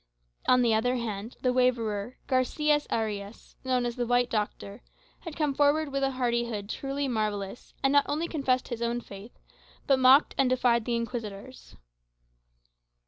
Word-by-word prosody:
On 250 0 +5
the 230 -2 +3
other 245 +3 +1
hand, 225 -2 -5
the 250 -1 +2
waverer, 240 -3 0
Garçias 295 +3 +1
Ariâs, 210 -1 -4
known 255 -1 0
as 240 -1 -3
the 240 -1 -1
"White 245 0 +2
Doctor," 210 0 -3 0.4
had 330 -4 -8
come 300 -3 0
forward 290 +2 +2
with 275 0 -2
a 270 - +2
hardihood 235 -4 -1
truly 275 +2 -3
marvellous, 210 -3 -3
and 270 0 +3
not 285 0 +4
only 310 +4 -1
confessed 265 -6 0
his 235 -2 -5
own 235 +1 0
faith, 200 +2 -12 0.5
but 270 -2 +3
mocked 260 +3 +6
and 270 -2 +4
defied 245 -3 +2
the 240 - 0
Inquisitors. 230 0 -6
245 Hz, 155 wpm, -28 LUFS, 225-270 Hz, 0.5 s, mocked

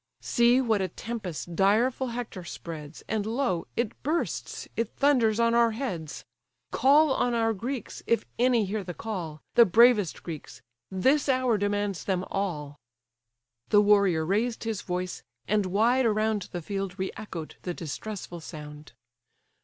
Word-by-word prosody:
See 240 +2 +4
what 220 -5 +1
a 190 - 0
tempest 180 -4 -6
direful 225 +8 +2
Hector 235 -6 -5
spreads, 160 -3 -8
And 220 -2 -1
lo! 225 -5 -1
it 235 -3 -2
bursts, 320 +4 -2
it 230 -1 -2
thunders 245 -6 +3
on 230 0 +3
our 235 -1 +4
heads! 175 - -4 0.5
Call 285 +3 +5
on 245 -2 +1
our 225 -1 +2
Greeks, 245 +5 -5
if 230 - +2
any 240 -3 +3
hear 205 +1 -3
the 175 -2 -7
call, 175 -9 -5
The 235 - +8
bravest 225 -2 +4
Greeks: 160 -6 -8 0.3
this 265 +11 +2
hour 255 -3 +3
demands 205 -2 -1
them 185 -2 0
all." 150 -7 -3 0.9
The 205 - +6
warrior 200 -6 +4
raised 220 +7 0
his 225 -3 -2
voice, 180 0 -3 0.3
and 205 -2 +1
wide 230 +6 +3
around 215 -2 0
The 175 -2 -5
field 195 0 -4
re 190 -1 -2
echoed 185 -7 -7
the 175 -2 -4
distressful 175 +2 -6
sound. 150 -3 -10
210 Hz, 145 wpm, -27 LUFS, 180-235 Hz, 0.9 s, The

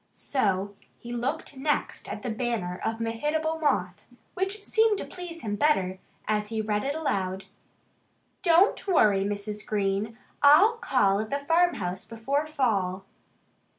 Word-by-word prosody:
So 200 -6 -1 0.2
he 240 0 -8
looked 270 +4 -3
next 295 +2 -1
at 210 +1 -6
the 245 - -2
banner 220 -6 -2
of 225 0 -2
Mehitable 300 +8 -1
Moth, 185 - 0 0.3
which 390 +3 -3
seemed 440 -1 +3
to - - -4
please 350 -4 -8
him 205 -2 -2
better, 190 -9 +1 0.3
as 210 0 0
he 220 0 -3
read 210 -1 0
it 280 +2 -1
aloud: 190 -11 -2 1.0
DON'T 360 +4 +4
WORRY, 210 - +4
MRS. 205 +1 -3
GREEN! 205 +2 -1 0.2
I'LL 375 +11 +7
CALL 200 - +2
AT 215 0 -3
THE 280 0 -3
FARMHOUSE 325 - +1
BEFORE 270 +7 -2
FALL. 195 -10 0
230 Hz, 140 wpm, -27 LUFS, 205-310 Hz, 1.0 s, I'LL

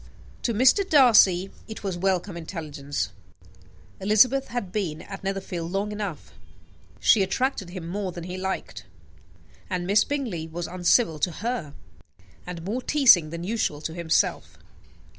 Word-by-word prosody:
To 235 - -1
Mr. 260 - +5
Darcy 210 - +5 0.2
it 220 - -8
was 195 -3 -2
welcome 185 0 -1
intelligence: 155 -4 -5 0.9
Elizabeth 240 +7 +4
had 235 -7 -4
been 180 -7 -3
at 195 -1 -9
Netherfield 185 -3 -4
long 200 +2 -1
enough. 205 -6 -6 0.7
She 215 - +5
attracted 195 0 -1
him 175 -2 -7
more 190 +1 -3
than 175 -1 -8
he 180 +1 -6
liked; 190 +1 -4 0.8
and 180 -2 -2
Miss 205 +3 +4
Bingley 230 - -3
was 170 +1 -5
uncivil 180 -1 +2
to 175 - +1
her 210 - -3 0.7
and 175 -2 -6
more 225 +7 -2
teasing 240 - +5
than 170 +1 -6
usual 200 -7 -1
to 160 - -4
himself. 165 -1 0
190 Hz, 140 wpm, -25 LUFS, 170-215 Hz, 0.9 s, Mr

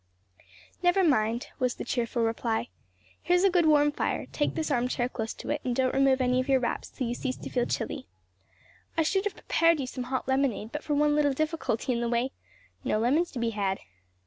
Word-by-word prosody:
"Never 355 +2 +4
mind," 235 -6 +1
was 250 -1 +1
the - - -6
cheerful 240 -1 -1
reply. 225 - -1 0.5
"Here's 355 +2 +3
a 390 - +5
good 345 -3 +3
warm 295 -1 +5
fire; - - -2
take 295 - -1
this 315 -1 -2
arm 245 -2 +2
chair 245 -1 0
close 225 -3 -4
to - - -5
it, 295 - -1
and 250 -2 -1
don't 260 0 +1
remove 270 -1 +3
any 250 0 +2
of 255 - -2
your 265 -1 +5
wraps 240 -2 -2
till 255 - -4
you 235 - -1
cease 255 +1 -3
to - - -8
feel 245 -1 +1
chilly. - - -3 0.9
I 325 - +4
should 385 +5 +1
have 405 -2 -2
prepared 330 -1 +2
you 270 - -1
some 250 0 -5
hot 260 0 -3
lemonade 265 -5 0
but 300 - -5
for 295 - -1
one 295 0 +3
little 290 -2 +3
difficulty 305 -5 -1
in 235 - -1
the 235 - 0
way; 240 +3 0 0.5
no - - +1
lemons 280 +10 +2
to - - -6
be 235 -1 0
had. 195 -3 -1
260 Hz, 220 wpm, -28 LUFS, 240-300 Hz, 0.9 s, a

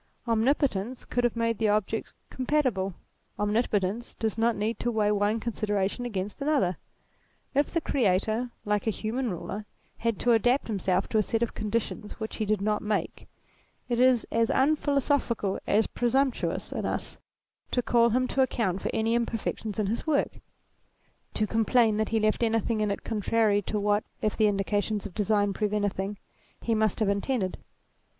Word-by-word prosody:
Omnipotence 235 -1 +1
could 245 - -1
have 240 -1 +1
made 230 -1 0
the 220 - +2
objects 215 +1 -1 0.2
compatible. 255 - 0 0.4
Omnipotence 210 0 0
does 220 -2 -1
not 230 +1 +2
need 220 +3 -2
to 240 - 0
weigh 215 -3 +2
one 210 +2 +1
considera 210 -4 0
tion 245 +5 -5
against 205 +3 -4
another. 275 - +1 0.8
If 285 +1 +2
the 335 - 0
Creator, 220 -1 +1 0.2
like 210 +1 0
a - - +5
human 230 +4 -2
ruler, 205 +3 -5 0.3
had 230 -3 0
to 245 - +3
adapt 245 +4 +3
himself 190 -3 0
to 220 - +2
a - - +5
set 225 +2 0
of 235 - -2
conditions 215 0 -3
which 220 -1 -6
he 215 - -1
did 210 -1 +1
not 210 +1 +1
make, 210 0 -2 0.6
it 240 -1 0
is 250 -2 +4
as 230 0 +2
unphilosophical 275 -7 +1
as 215 +2 +3
presumptuous 260 +2 0
in - - -3
us - - -3 0.5
to 245 - 0
call 235 0 +4
him 255 +3 +1
to 270 - +1
account 195 -8 0
for - - -2
any 225 +1 +1
imperfections 225 -2 -2
in 215 - +1
his 225 +9 -2
work; 295 -3 +1 1.0
to 215 - +2
complain 225 0 +3
that 220 0 0
he 225 - +1
left 215 +1 +1
anything 225 -1 +1
in 210 - +1
it 200 - -3
contrary 215 -1 +2
to 210 +2 -2
what, 205 +1 +2 0.2
if 215 - 0
the 215 - +4
indications 205 +1 0
of 205 - -7
design 205 0 +1
prove 210 +1 -1
anything, 205 -1 -1 0.4
he 230 - -1
must 215 -2 +1
have 210 - +3
intended. 200 -1 -1
220 Hz, 170 wpm, -28 LUFS, 205-235 Hz, 1.0 s, a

